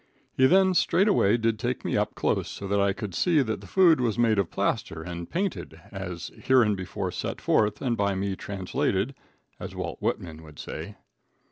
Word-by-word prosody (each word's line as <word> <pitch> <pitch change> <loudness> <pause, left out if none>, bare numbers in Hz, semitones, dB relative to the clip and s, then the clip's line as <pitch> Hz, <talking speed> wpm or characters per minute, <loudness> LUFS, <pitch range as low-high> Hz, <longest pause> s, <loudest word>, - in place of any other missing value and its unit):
He 130 - +5
then 190 +3 +4
straightway 180 - +3
did 115 -2 0
take 125 0 -3
me - - 0
up - - 0
close - - 0
so 100 - -6
that 100 +1 +1
I 100 0 +3
could 100 -1 -6
see 155 - +3
that 110 -3 -3
the - - -12
food 170 -7 +5
was 115 -3 0
made 115 -3 +3
of 95 - 0
plaster 80 0 -2
and 85 0 -6
painted, 180 - -3
as 90 -3 -6
hereinbefore 105 -8 +1
set - - -4
forth 105 +3 +1
and 120 -3 +1
by 100 -2 0
me 95 0 -2
translated, 100 +4 -2 0.5
as - - -7
Walt - - -5
Whitman 80 -2 -3
would 75 -2 -14
say. - - -7
105 Hz, 180 wpm, -26 LUFS, 95-130 Hz, 0.5 s, He